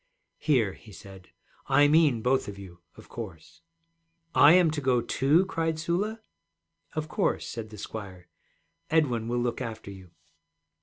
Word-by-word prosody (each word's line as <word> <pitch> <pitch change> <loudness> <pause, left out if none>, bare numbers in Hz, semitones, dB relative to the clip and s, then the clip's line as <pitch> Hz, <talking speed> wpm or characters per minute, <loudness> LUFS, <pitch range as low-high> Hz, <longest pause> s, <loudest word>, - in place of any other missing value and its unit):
'Here,' 120 - +1
he 110 - -16
said, 95 -2 -13 0.4
'I 145 - +5
mean 150 -7 +4
both 130 +1 +1
of 100 -1 -7
you, 90 -3 -12 0.2
of - - -14
course.' 95 - -10 0.7
'I 150 - +7
am 175 -3 +5
to 150 -1 -3
go, 130 -2 +2
too?' 135 +9 +2
cried 165 -3 -2
Sula. 190 +7 -2 0.7
'Of 155 0 -2
course,' - - -1
said 115 -2 -6
the 105 - -11
squire. 95 -4 -8 0.6
'Edwin 125 -8 +1
will 120 +1 -1
look 120 +1 -2
after 110 -4 -6
you.' 95 -2 -13
120 Hz, 150 wpm, -27 LUFS, 105-155 Hz, 0.7 s, I